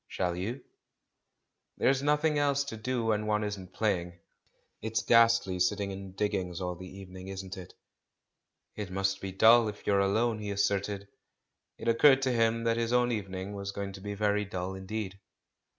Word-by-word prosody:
"ShaU 90 Hz, -1 st, -1 dB
ymir 100 Hz, +9 st, -4 dB, 1.1 s
"There's 135 Hz, 0 st, +3 dB
nothing 150 Hz, +1 st, +2 dB
else 140 Hz, -1 st, +2 dB
to 140 Hz, -5 st, -6 dB
do 120 Hz, +1 st, -2 dB
when 105 Hz, -1 st, 0 dB
one 105 Hz, 0 st, +1 dB
isn't 100 Hz, -3 st, -5 dB
playing. 90 Hz, -4 st, -1 dB, 0.6 s
It's 110 Hz, +2 st, -1 dB
ghastly 115 Hz, -5 st, +4 dB
sitting 100 Hz, +2 st, +1 dB
in 95 Hz, -1 st, -8 dB
diggings 95 Hz, -4 st, -1 dB
all 90 Hz, -1 st, -2 dB
the 90 Hz, +1 st, -9 dB
evening, 95 Hz, -1 st, -10 dB
isn't 95 Hz, 0 st, -6 dB
it?" 90 Hz, -2 st, -10 dB, 1.0 s
"It 105 Hz, -3 st, -5 dB
must 95 Hz, +1 st, -1 dB
be 95 Hz, -, -4 dB
dull 110 Hz, +4 st, +6 dB
if 105 Hz, -1 st, -7 dB
you're 100 Hz, -1 st, +3 dB
alone," 110 Hz, +3 st, +1 dB
he 105 Hz, -1 st, -5 dB
assented. 100 Hz, 0 st, -1 dB, 0.7 s
It -, -, -7 dB
occurred 135 Hz, +4 st, +5 dB
to 130 Hz, -, +2 dB
him 115 Hz, -1 st, +2 dB
that 115 Hz, 0 st, +1 dB
his 115 Hz, 0 st, 0 dB
own 125 Hz, 0 st, +3 dB
evening 95 Hz, -2 st, -4 dB
was 100 Hz, -1 st, -4 dB
going 100 Hz, -1 st, -5 dB
to 95 Hz, -, -10 dB
be 100 Hz, +1 st, -5 dB
very 105 Hz, 0 st, +1 dB
dull 95 Hz, -2 st, -4 dB
indeed. 95 Hz, 0 st, -5 dB
100 Hz, 170 wpm, -30 LUFS, 95-115 Hz, 1.1 s, dull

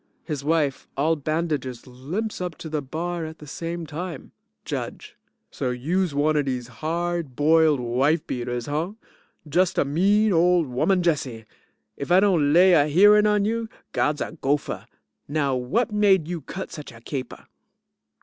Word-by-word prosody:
His 150 Hz, -4 st, -4 dB
wife, 150 Hz, -3 st, 0 dB
all 155 Hz, +4 st, +2 dB
bandages, 150 Hz, -5 st, -2 dB
limps 155 Hz, -, -5 dB
up 180 Hz, -3 st, -3 dB
to 160 Hz, -, -7 dB
the 155 Hz, -1 st, -2 dB
bar 165 Hz, +5 st, -4 dB
at 160 Hz, 0 st, -7 dB
the 150 Hz, -, -12 dB
same 165 Hz, +3 st, -5 dB
time.) 160 Hz, 0 st, -6 dB, 0.3 s
JUDGE -, -, -5 dB, 0.4 s
So 125 Hz, -, -2 dB
youse 155 Hz, +7 st, -1 dB
one 150 Hz, +2 st, +2 dB
of 145 Hz, -2 st, +2 dB
dese 125 Hz, -2 st, -3 dB
hard 170 Hz, -3 st, -2 dB
boiled 155 Hz, 0 st, +4 dB
wife 130 Hz, +7 st, +1 dB
beaters, 120 Hz, -1 st, -3 dB
huh? 155 Hz, +7 st, -2 dB, 0.5 s
Just 175 Hz, +4 st, +1 dB
a -, -, +3 dB
mean 200 Hz, +8 st, +3 dB
old 175 Hz, 0 st, +4 dB
woman 175 Hz, +9 st, +1 dB
Jessie! 135 Hz, -9 st, -1 dB, 0.5 s
If 140 Hz, -, -5 dB
I 180 Hz, -, +7 dB
don't 175 Hz, -8 st, +3 dB
lay 180 Hz, +3 st, +6 dB
a 150 Hz, -3 st, +5 dB
hearing 205 Hz, +7 st, +6 dB
on 210 Hz, -1 st, +2 dB
you, 225 Hz, +1 st, -1 dB, 0.2 s
God's 150 Hz, 0 st, 0 dB
a -, -, -4 dB
gopher! 145 Hz, +2 st, -1 dB, 0.4 s
Now 145 Hz, -2 st, 0 dB
what 195 Hz, -, 0 dB
made 200 Hz, -6 st, +3 dB
you 175 Hz, -2 st, -4 dB
cut 190 Hz, +7 st, -7 dB
such 150 Hz, -, -8 dB
a 115 Hz, -, -13 dB
caper? 130 Hz, 0 st, -6 dB
155 Hz, 160 wpm, -24 LUFS, 140-180 Hz, 0.5 s, I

